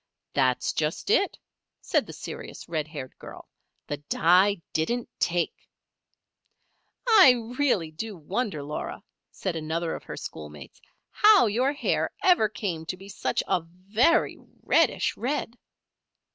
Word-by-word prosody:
"That's 130 -3 +1
just 155 - -1
it," 400 -4 +2 0.4
said - - 0
the - - -8
serious, - - -8
red 155 -3 -2
haired 140 -4 -8
girl. - - -11 0.4
"The 145 - -4
dye 180 +7 +3
didn't 235 +10 -1
take." 175 -1 -1 1.4
"I 400 - +8 0.3
really 195 - +2
do 205 +5 -6
wonder, 180 - -3
Laura," 150 +2 -5 0.3
said 185 -3 -4
another 160 +1 -2
of - - -7
her - - -7
schoolmates, 75 -3 -9 0.3
"how 420 - +6
your 245 +6 +1
hair 290 - 0
ever 350 - +5
came 180 -6 -4
to 185 - -4
be 195 +2 -12
such - - -1
a 180 - +1
very 195 - +1 0.3
reddish - - +2
red." 250 -1 -2
185 Hz, 130 wpm, -26 LUFS, 155-240 Hz, 1.4 s, I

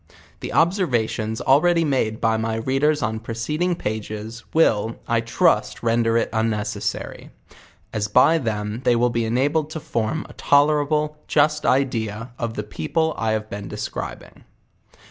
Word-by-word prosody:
The - - -6
observations 120 - +1
already 165 +5 +4
made 120 -6 0
by 115 0 +2
my 110 0 -1
readers 135 +5 +1
on 110 +1 -1
proceeding 150 +11 -2
pace's, 110 -1 -5
will, 115 -8 +2
I 115 -1 +2
trust 115 +1 +1
render 115 0 +2
it - - 0
unnecessary; 110 -2 -2 0.6
as 105 -1 -1
by 130 +10 +5
them 105 -2 -3
they 125 -2 +3
will 120 +1 +2
be 115 0 0
enabled 145 +7 +1
to 160 - -5
form 120 +4 -2
a - - -13
tolerable 150 +1 +2
juet 150 0 +2
idea 115 -4 0
of 115 -1 -3
the 105 - -3
people 155 +8 -1
I 110 -1 0
have 110 0 -2
been 100 -2 -7
descri - - -5
bing. - - -18
115 Hz, 145 wpm, -22 LUFS, 110-150 Hz, 0.6 s, by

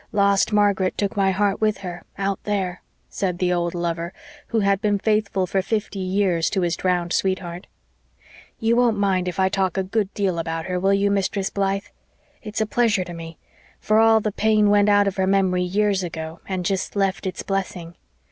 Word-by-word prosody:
Lost 200 0 +3
Margaret 200 -3 +2
took 200 -1 -1
my 195 -1 +2
heart 195 +1 0
with 215 -1 +2
her 175 -1 -6
out 195 0 -2
there," 190 -3 -2 0.3
said 180 -3 -2
the 180 0 +1
old 175 0 -1
lover, 170 0 -3 0.3
who 225 -2 0
had 200 0 +2
been 205 -1 +2
faithful 210 -2 0
for 190 +1 0
fifty 210 0 -3
years 185 -3 +1
to 195 - -1
his 170 -1 0
drowned 175 -1 0
sweetheart. 185 -1 -2 0.9
"You 225 0 +2
won't 240 -3 +3
mind 190 -3 +1
if 180 - -4
I 190 - +4
talk 190 -1 -1
a 190 - +1
good 200 +1 -1
deal 190 -4 0
about 165 0 -3
her, 180 -1 -2
will 195 +2 +3
you, 200 0 +1
Mistress 195 0 -1
Blythe? 195 0 -1 0.6
It's 215 0 -4
a - - +2
pleasure 215 -3 +1
to 175 -1 -8
me 165 -1 -9 0.4
for 215 +1 +2
all 225 0 +6
the 215 0 -2
pain 215 0 +3
went 205 0 +4
out 205 0 +4
of 200 0 -2
her 190 0 +1
memory 190 -2 +2
years 195 +2 +1
ago 160 -2 -6
and 185 -2 -3
jest 190 +1 -2
left 195 -1 0
its 185 - -4
blessing. 185 -3 -3
195 Hz, 195 wpm, -22 LUFS, 180-205 Hz, 0.9 s, all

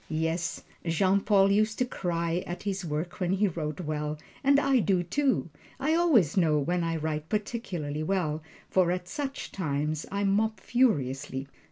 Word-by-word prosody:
Yes, 160 +2 -1 0.2
Jean 185 +4 +3
Paul 200 -1 +4
used 215 +2 +2
to 250 - +2
cry 170 -5 -1
at 175 - -5
his 195 -2 -2
work 160 +2 -3
when 180 -1 +1
he 200 +2 +3
wrote 155 -3 -4
well, 150 -1 -2 0.3
and 280 +1 +5
I 275 -2 +3
do, 190 -4 +2
too. 260 - 0 0.3
I 295 +4 +1
always 300 - +4
know 160 -5 +3
when 175 +5 0
I 165 0 -1
write 155 -1 -3
particularly 190 -9 -3
well, 155 -3 0 0.3
for 185 -2 +3
at 180 0 -3
such 280 +5 -4
times 150 -3 -2
I 200 +1 -1
mop 215 +3 +1
furiously. 135 - +1
180 Hz, 165 wpm, -28 LUFS, 155-210 Hz, 0.3 s, and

